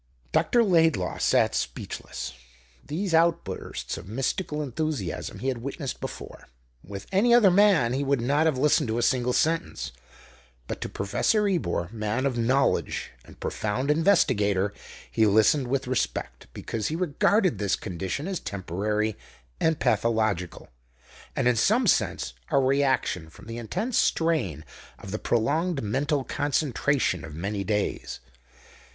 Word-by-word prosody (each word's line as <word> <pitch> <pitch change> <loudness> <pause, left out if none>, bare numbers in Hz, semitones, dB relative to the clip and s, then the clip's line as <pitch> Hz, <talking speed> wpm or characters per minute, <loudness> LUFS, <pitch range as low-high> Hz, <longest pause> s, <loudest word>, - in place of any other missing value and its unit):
Dr. 240 - +3
Laidlaw 165 - +2
sat - - +3
speechless. 65 - -4 0.5
These 170 +5 -3
outbursts 165 - 0
of 90 - -12
mystical 150 - -2
enthusiasm 140 - -3
he 130 - -4
had 125 -3 -2
witnessed 140 +2 -5
before. - - -8 0.4
With 100 0 -8
any 235 +5 +5
other 210 -6 +6
man 180 - +4
he 135 +2 0
would 140 -1 +1
not 145 +7 +2
have 150 -5 +1
listened 145 -1 +3
to 110 +1 -1
a 120 - +1
single 125 0 +2
sentence, 160 - 0 0.7
but - - -6
to - - -3
Professor 205 - +1
Ebor, 120 - -1
man 110 +3 -2
of 135 -3 0
knowledge 130 +4 +1
and - - -16
profound 125 +7 -1
investigator, 105 - +2 0.4
he 110 -1 +3
listened 110 +6 +4
with 135 +1 -1
respect, 130 0 -3
because 110 -2 -4
he 160 - -2
regarded 180 - +2
this 100 -2 +1
condition 95 - -4
as 195 -2 -2
temporary 105 +3 -2 0.4
and 160 -1 +1
pathological, 110 -6 0 0.7
and - - +1
in 125 - +4
some 225 - +3
sense 65 - +1 0.2
a - - +2
reaction 130 - +1
from - - -15
the 115 +1 -6
intense 200 - -1
strain 130 - 0 0.3
of 95 - -9
the 105 - -3
prolonged 145 +7 0
mental 140 +6 0
concentration 140 - 0
of 75 - -8
many 100 +4 -3
days. 105 +1 -2
130 Hz, 140 wpm, -26 LUFS, 105-160 Hz, 0.7 s, other